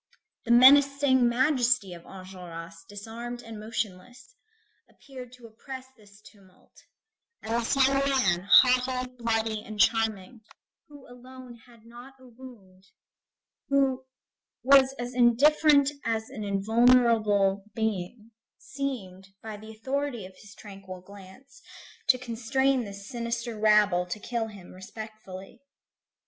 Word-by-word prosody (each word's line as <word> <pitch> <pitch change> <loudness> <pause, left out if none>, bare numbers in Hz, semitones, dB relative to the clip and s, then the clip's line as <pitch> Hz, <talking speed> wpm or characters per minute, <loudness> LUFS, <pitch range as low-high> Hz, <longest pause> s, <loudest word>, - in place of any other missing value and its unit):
The 235 - -1
menacing 270 0 +5
majesty 245 -5 +1
of 170 -1 -13
Enjolras 180 -3 -10 0.2
disarmed 230 +4 -8
and 225 -2 -10
motionless, 220 - -6 0.6
appeared 255 -3 -12
to 250 -2 -15
oppress 260 +4 -10
this 205 -2 -20
tumult, 195 -4 -21 0.7
and 230 +2 -1
this 230 - -1
young 275 0 +1
man, 200 -9 0
haughty, 255 0 +4
bloody, 225 -2 -1
and 215 -2 -10
charming, 220 +1 0 0.5
who 290 -2 -15
alone 250 0 -13
had 230 -2 -20
not 240 +3 -14
a 260 - -18
wound, 225 -7 -16 0.8
who 270 -2 +1 0.6
was 270 0 +5
as 245 +1 -6
indifferent 280 +4 +4
as 225 -1 -3
an 215 - -7
invulnerable 210 -1 +2
being, 220 +1 -4 0.3
seemed, 210 -10 -6 0.2
by 220 -1 -7
the 215 +1 -12
authority 255 0 -4
of 185 0 -14
his 205 -1 -15
tranquil 195 -3 -11
glance, 200 - -16 0.5
to 255 - +4
constrain 255 +2 -1
this 200 0 -10
sinister 235 -1 -4
rabble 210 -4 +3
to 180 +4 -5
kill 230 +2 -3
him 200 -5 -13
respectfully. 195 0 -11
230 Hz, 120 wpm, -27 LUFS, 200-255 Hz, 0.8 s, menacing